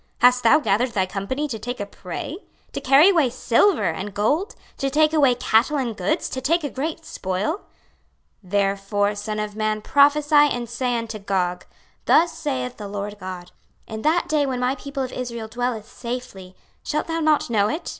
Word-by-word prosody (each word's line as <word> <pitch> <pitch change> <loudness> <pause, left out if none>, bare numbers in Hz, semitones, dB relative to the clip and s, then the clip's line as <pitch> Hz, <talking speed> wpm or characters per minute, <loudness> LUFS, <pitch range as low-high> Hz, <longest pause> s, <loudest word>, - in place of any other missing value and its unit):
hast 250 +1 +5
thou 235 +6 +6
gathered 245 -2 +1
thy 190 -4 +1
company 200 +10 -3
to 230 -6 -5
take 245 +3 -5
a 205 - -2
prey? 200 - -7 0.3
to - - -5
carry 275 +6 +6
away 325 -9 +3
silver 250 - +2
and 190 +4 -4
gold, 295 - 0 0.2
to 275 - -1
take 305 +2 +3
away 275 -5 +4
cattle 245 +4 +2
and 245 -5 -2
goods, 185 0 -1
to 260 - -5
take 330 +5 +1
a 290 - -3
great 315 +4 -4
spoil? 190 - -2 0.9
26:038:014 185 - -17
Therefore, 200 +1 +1
son 210 +1 -4
of 210 -1 -4
man, 215 0 -1
prophesy 290 +2 +3
and 285 -5 +4
say 245 +1 -1
unto 230 -2 -5
Gog, 185 -3 -1 0.4
Thus 335 +1 +4
saith 260 -6 -3
the 210 - -7
Lord 205 +1 -5
GOD; 185 -2 -7 0.3
In 220 -1 -6
that 320 +6 +2
day 300 -2 +1
when 255 -2 -2
my 250 +1 +1
people 280 -1 -5
of 255 - -6
Israel 235 -3 -5
dwelleth 235 -2 -3
safely, 235 -7 -7 0.3
shalt 300 - -2
thou 330 0 -2
not 305 -5 +2
know 210 -2 +2
it? 315 - -4
245 Hz, 185 wpm, -23 LUFS, 205-290 Hz, 0.9 s, thou